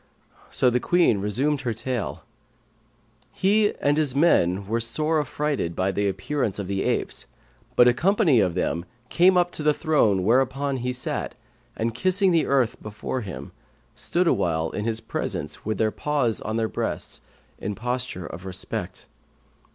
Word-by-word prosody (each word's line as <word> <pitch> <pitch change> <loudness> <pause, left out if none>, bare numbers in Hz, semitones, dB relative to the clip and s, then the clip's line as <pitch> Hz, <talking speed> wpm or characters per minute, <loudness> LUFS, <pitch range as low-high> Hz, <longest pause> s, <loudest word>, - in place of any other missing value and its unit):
so - - +2
the 125 - +2
Queen 170 - +3
resumed 130 +9 0
her 120 -3 -1
tale: 120 -1 -3 1.1
"He 205 +2 +2
and 145 +1 +2
his 145 -4 +1
men 100 - +3
were 115 +4 -1
sore 150 +7 0
affrighted 145 - -2
at 95 +1 +1
the 100 +1 0
appearance 130 0 -2
of 100 - -3
the 95 +1 -2
apes, - - -2 0.5
but 120 - +7
a 125 - +6
company 175 - +3
of 90 -4 +1
them 85 -1 -1 0.2
came 180 +1 +5
up 175 0 +2
to - - -5
the 150 0 +3
throne 110 - +2
whereon 135 +5 +1
he 125 0 -2
sat 125 -1 -3 0.4
and, 115 +1 -1
kissing 185 - +2
the 165 -2 +2
earth 130 -4 +1
before 110 +4 -4
him, 95 -5 -7 0.4
stood 175 +1 0
awhile 80 - +1
in 105 - -3
his 115 0 -1
presence - - -4
with 110 -1 -1
their 110 -1 +1
paws 140 -6 0
upon 110 - -4
their 115 -1 +1
breasts - - -4 0.4
in 105 +1 -3
posture 125 -3 -3
of 90 - -8
respect. 95 0 -5
125 Hz, 160 wpm, -24 LUFS, 105-150 Hz, 1.1 s, but